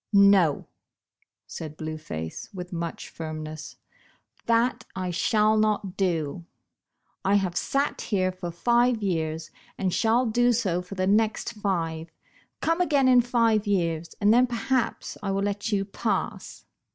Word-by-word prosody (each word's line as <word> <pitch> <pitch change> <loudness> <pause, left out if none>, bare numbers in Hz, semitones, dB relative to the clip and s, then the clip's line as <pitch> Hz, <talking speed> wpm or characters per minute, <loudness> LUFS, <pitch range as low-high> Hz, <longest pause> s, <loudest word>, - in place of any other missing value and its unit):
"No," 200 -6 +5 0.8
said 155 -1 -8
Blue 155 0 -5
Face, 80 - -6
with 180 -3 -7
much 170 -1 -4
firmness, 155 -1 -7 0.3
" - - -36
that 235 +2 +2
I 185 -1 -2
shall 215 +5 +2
not 210 -3 0
do. 170 -3 -1 0.8
I 195 +1 +3
have 190 -3 +1
sat 280 +1 0
here 185 -3 0
for 180 -1 -6
five 235 +5 +2
years, 160 -4 -2 0.3
and 185 -2 -1
shall 230 +3 +2
do 240 +2 +3
so 185 -6 0
for 180 +2 -9
the 185 0 0
next 220 +3 +1
five. 170 -6 -2 0.5
Come 330 +2 +1
again 285 -6 +3
in 250 -1 +6
five 230 -3 +2
years, 170 -4 -1
and 205 +1 +4
then 250 +2 +5
perhaps 245 +1 -2
I 200 - -3
will 195 0 0
let 205 +2 -2
you 195 -1 +1
pass." 200 0 -3
195 Hz, 145 wpm, -26 LUFS, 170-225 Hz, 0.8 s, in